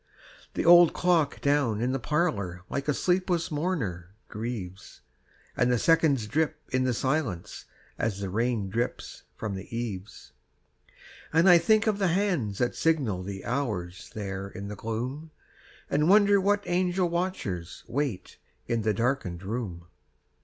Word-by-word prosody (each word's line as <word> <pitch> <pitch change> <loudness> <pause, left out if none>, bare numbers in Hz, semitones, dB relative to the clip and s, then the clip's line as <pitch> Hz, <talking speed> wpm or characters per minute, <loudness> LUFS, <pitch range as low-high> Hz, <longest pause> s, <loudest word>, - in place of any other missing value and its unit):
The - - -1
old 175 -1 +8
clock 170 -5 +1
down 140 -7 +2
in 125 +3 0
the 135 - -1
parlor 100 - -1
Like 140 0 -3
a 150 - +3
sleepless 180 -2 0
mourner 110 - -3
grieves, 105 -4 -6 0.5
And 125 0 +2
the 125 - +3
seconds 145 -4 +3
drip 150 +7 0
in 130 0 +1
the 130 - +1
silence 130 - -2 0.3
As 105 -3 -1
the 100 -2 -4
rain 115 -1 0
drips 120 +3 -3
from 105 -3 -4
the 95 0 -7
eaves. 100 - -6 1.0
And 165 +4 +4
I 175 -2 +8
think 215 +4 +3
of 210 -2 +1
the 195 - +2
hands 170 - 0
that 120 - 0
signal 135 - +1
The 95 +1 -7
hours 105 -9 -3
there 100 -2 -4
in 100 0 -7
the 105 - -5
gloom, 125 +9 -4 0.6
And 150 +3 +2
wonder 200 0 +6
what 205 +1 +2
angel 180 0 +1
watchers 170 - -3
Wait 135 -7 -3 0.3
in 115 -1 -1
the 110 -1 +1
darkened 115 -7 -1
room. 95 -5 -4
125 Hz, 145 wpm, -27 LUFS, 100-165 Hz, 1.0 s, old